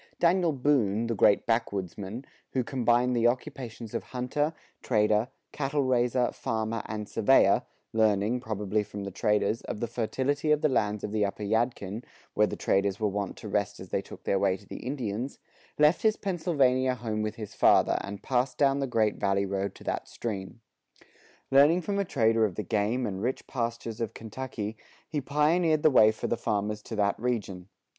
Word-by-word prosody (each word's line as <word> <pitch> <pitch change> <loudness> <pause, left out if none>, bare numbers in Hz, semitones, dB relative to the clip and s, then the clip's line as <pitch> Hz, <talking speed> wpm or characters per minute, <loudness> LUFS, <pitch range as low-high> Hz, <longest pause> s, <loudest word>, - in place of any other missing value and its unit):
Daniel 175 0 +3
Boone, 125 -6 +1
the 115 - -1
great 100 -1 +4
backwoodsman, 105 0 -2 0.3
who 130 - +1
combined 120 0 +2
the 120 0 +4
occupations 120 -3 -4
of - - -1
hunter, 130 +5 -1 0.3
trader, 105 -1 +2 0.2
cattle 140 0 -1
raiser, 125 -1 +2
farmer, 115 -2 -2
and 105 -1 -5
surveyor 115 +5 +4 0.3
learning, 110 +1 +2
probably 105 -3 -1
from 100 -1 -7
the 100 - -5
traders, 105 +3 +1
of - - -6
the 120 - -1
fertility 130 +6 -1
of 150 0 +3
the 155 - +4
lands 105 -6 0
of 105 - -3
the 105 -1 +1
upper 100 +1 -3
Yadkin, 110 0 -1 0.3
where 105 0 +3
the - - -4
traders 100 0 +1
were 110 - +1
wont 100 -1 -3
to - - -8
rest - - -1
as - - -9
they - - 0
took - - -12
their 100 - +1
way 95 -1 +2
to 100 - -19
the - - -8
Indians, 125 -1 -4 0.4
left 150 +3 +4
his 215 -1 +3
Pennsylvania 140 -9 +1
home 110 -3 -3
with 110 0 -2
his 105 -3 -8
father, - - +4
and 100 0 -7
passed 125 0 0
down 140 -1 +3
the 135 - -1
Great 110 -4 +1
Valley 100 0 +1
road 100 0 -2
to - - -13
that - - -3
stream. 105 0 -6 0.9
Learning 145 +6 +6
from 200 +3 -2
a 200 - +1
trader 115 -7 +2
of 100 -5 0
the 105 - -3
game 110 +5 0
and 95 -3 -4
rich 125 +4 -2
pastures 115 -2 -4
of 115 -1 -3
Kentucky, 110 -1 -5 0.3
he 150 -3 -2
pioneered 155 +3 +2
the 155 - +6
way 110 -4 +7
for 110 - -6
the 120 - 0
farmers 105 +1 -1
to 110 - -7
that 100 -1 +1
region. 100 -6 -3
115 Hz, 185 wpm, -28 LUFS, 105-130 Hz, 0.9 s, way